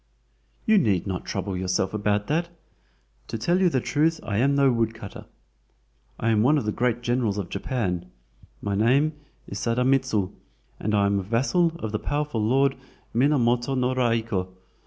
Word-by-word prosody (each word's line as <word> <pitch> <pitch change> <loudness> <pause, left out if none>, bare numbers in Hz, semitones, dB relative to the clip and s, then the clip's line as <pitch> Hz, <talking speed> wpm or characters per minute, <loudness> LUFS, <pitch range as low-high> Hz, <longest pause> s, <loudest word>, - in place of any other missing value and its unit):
"You 220 -2 +5
need 100 - +1
not 95 -3 -4
trouble 95 -1 -3
yourself 95 +1 -1
about 105 0 0
that. 165 +6 0 0.8
To - - -4
tell 175 - +1
you 185 - +5
the 135 - +1
truth 160 +5 +1
I 100 - -2
am 140 +3 +3
no 140 -1 +4
woodcutter! 115 -3 -3 0.9
I 115 - 0
am 110 -2 +3
one 145 +7 +4
of 140 - -1
the 105 - 0
great 120 +1 0
generals 120 -4 0
of 95 -4 -4
Japan. 100 - -2 0.6
My 100 - -1
name 130 +9 +3 0.3
is 100 - -5
Sadamitsu, 125 -4 +1 0.5
and 105 0 0
I 100 -1 +3
am 100 0 +2
a - - -1
vassal 135 - +1
of 110 -10 -4
the 110 - -1
powerful 145 -5 -2
Lord 135 +4 +2 0.4
Minamoto 125 -1 +2
no 125 0 +1
Raiko. 115 -6 0
115 Hz, 165 wpm, -25 LUFS, 105-135 Hz, 0.9 s, You